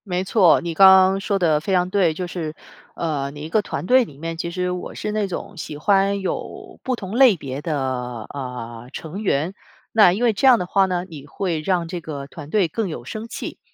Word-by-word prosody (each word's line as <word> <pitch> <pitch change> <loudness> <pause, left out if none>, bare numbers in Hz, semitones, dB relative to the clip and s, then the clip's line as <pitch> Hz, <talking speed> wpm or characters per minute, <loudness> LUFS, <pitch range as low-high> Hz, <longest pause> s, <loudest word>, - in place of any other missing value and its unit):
没 180 -1 -1
错， 190 -2 +4
你 170 -1 -4
刚 190 +4 +8
刚 190 0 +6
说 200 0 -1
得 160 -5 +2
非 190 +6 -2
常 180 0 +2
对。 185 -5 +3
就 180 - -3
是， 165 -3 -5 0.4
呃， 145 -5 -2
你 145 0 -10
一 155 - -6
个 215 - +2
团 205 - -5
队 255 +5 +5
里 145 - -12
面， 165 +2 -5
其 170 +1 -4
实 180 +1 -2
我 180 0 -6
是 210 - -3
那 210 -1 0
种 190 +2 -6
喜 150 -2 -6
欢 200 +4 +2
有 190 - -5
不 260 -2 -1
同 200 -2 -7
类 255 -6 +7
别 135 -1 -6
的， 155 -2 -2 0.5
呃， 125 -3 -7
成 170 +6 -6
员。 170 -3 0 0.4
那 210 -5 +6
因 205 +7 -2
为 235 -2 +4
这 210 +7 +2
样 250 -2 +8
的 180 - -3
话 195 +2 +3
呢， 180 -1 -2
你 150 -5 -11
会 170 0 -2
让 175 0 0
这 175 0 -5
个 145 -3 -6
团 145 +1 -10
队 200 -1 +2
更 205 +4 -3
有 120 -7 -7
生 215 - -6
气。 - - -7
180 Hz, 245 characters per minute, -22 LUFS, 155-195 Hz, 0.5 s, 刚